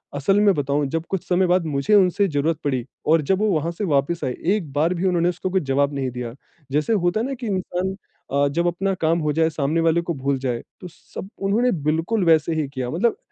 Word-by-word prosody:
असल 195 +9 +2
में 205 -2 +5
बताऊँ, 145 0 0
जब 165 +3 -3
कुछ 195 -3 -2
समय 180 0 +2
बाद 180 -1 +2
मुझे 145 +5 0
उनसे 200 +1 +4
ज़रूरत 155 0 0
पड़ी 130 -4 -1 0.2
और 160 +1 +4
जब 190 +6 +1
वो 215 0 +2
वहाँ 165 -1 0
से 170 +5 -5
वापस 150 +2 0
आए, 125 - -1
एक 180 -2 -1
बार 160 +5 +2
भी 180 +2 -2
उन्होंने 175 -1 +2
उसको 185 +1 -3
कुछ 190 -1 0
जवाब 140 +1 +1
नहीं 135 -2 -2
दिया। 120 -1 -5 0.4
जैसे 150 +10 +1
होता 175 0 +1
है - - -1
ना 275 - -3
कि 240 -2 -6
इंसान 185 -1 -2 0.4
अ, 140 +1 +3
जब 170 +5 0
अपना 195 +3 0
काम 165 +1 +2
हो 150 -2 0
जाए 160 +1 +2
सामने 155 +1 -1
वाले 165 +1 +3
को 170 0 -3
भूल 135 0 -1
जाए, 125 -3 -2 0.2
तो 180 - -7
सब 185 +3 -10
उन्होंने 230 +6 +2 0.2
बिल्कुल 170 +7 +1
वैसे 160 0 +4
ही 155 -3 -1
किया। 130 -3 -4
मतलब 220 - +1
165 Hz, 235 wpm, -22 LUFS, 145-185 Hz, 0.4 s, में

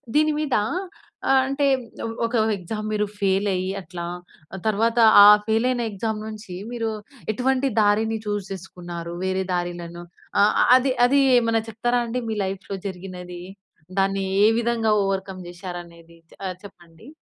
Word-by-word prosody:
దీని 305 0 +4
మీద 295 -4 0 0.9
అంటే 275 +1 0 0.6
ఒక 230 +1 -2 0.2
ఎగ్జామ్ 210 +3 -5
మీరు 210 0 +1
ఫెయిల్ 195 +1 +1
అయ్యి 185 +1 -2
అట్లా, 175 -1 -7 0.6
తర్వాత 225 +3 +1 0.3
ఆ - - +10 0.2
ఫెయిల్ 220 +2 +2
అయిన 250 -2 0
ఎగ్జామ్ 215 +2 -3
నుంచి 215 -4 -8 0.2
మీరు 230 -2 -2 0.4
ఎటువంటి 265 +4 +1
దారిని 220 +2 +2
చూస్ 205 -2 -2
చేసుకున్నారు? 175 -2 -8
వేరే 190 0 0
దారిలను 175 -1 -4 0.4
ఆహ్, 205 +1 +4 0.2
అది 260 +1 +1
అది 275 +3 +4 0.2
ఏమన్నా 230 -1 +2
చెప్తారా 240 +3 0
అండి 240 +2 -3
మీ 220 - -2
లైఫ్‌లో 195 +1 -5
జరిగినది. 180 -1 -8 0.6
దాన్ని 195 0 +1 0.2
ఏ - - +7
విధంగా 230 -2 +1
ఓవర్‌కమ్ 190 -1 -3
చేశారనేది 170 -2 -10 0.3
ఆహ్, 185 -1 -3
చెప్పండి. 175 +1 -15
200 Hz, 130 wpm, -23 LUFS, 180-230 Hz, 0.9 s, ఆ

